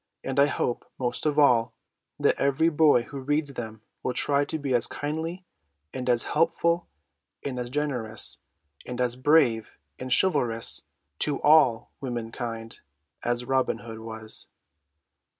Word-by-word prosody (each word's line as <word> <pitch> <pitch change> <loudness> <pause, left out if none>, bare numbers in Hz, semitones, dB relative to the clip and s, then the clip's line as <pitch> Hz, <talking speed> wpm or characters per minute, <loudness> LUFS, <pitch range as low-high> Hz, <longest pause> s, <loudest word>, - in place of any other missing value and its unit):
And 135 +1 -1
I 140 - +6
hope, 120 - -2
most 125 +3 -1
of 150 -1 0
all, 125 -6 +4 0.4
that - - +2
every 140 +4 +3
boy 150 -6 +4
who 140 +3 -8
reads 145 +1 -1
them 110 -3 -7 0.2
will 125 - -2
try 140 0 +2
to 160 - -3
be 140 -3 -2
as 120 - +3
kindly 160 +5 -4 0.5
and 125 -1 -3
as 120 -1 +3
helpful 170 +2 +1 0.6
and 130 -3 -3
as 120 0 -4
generous 125 -6 -2 0.4
and 125 - -6
as 125 -1 +1
brave 130 -5 +3 0.2
and 130 0 -6
chivalrous 125 -9 +1 0.3
to 145 -2 +3
all 145 -7 +5
woman 120 -4 -4
kind 115 -2 -6 0.4
as 120 +1 -1
Robin 130 0 +1
Hood 115 -1 -9
was. 110 -1 -6
130 Hz, 145 wpm, -27 LUFS, 120-145 Hz, 0.6 s, I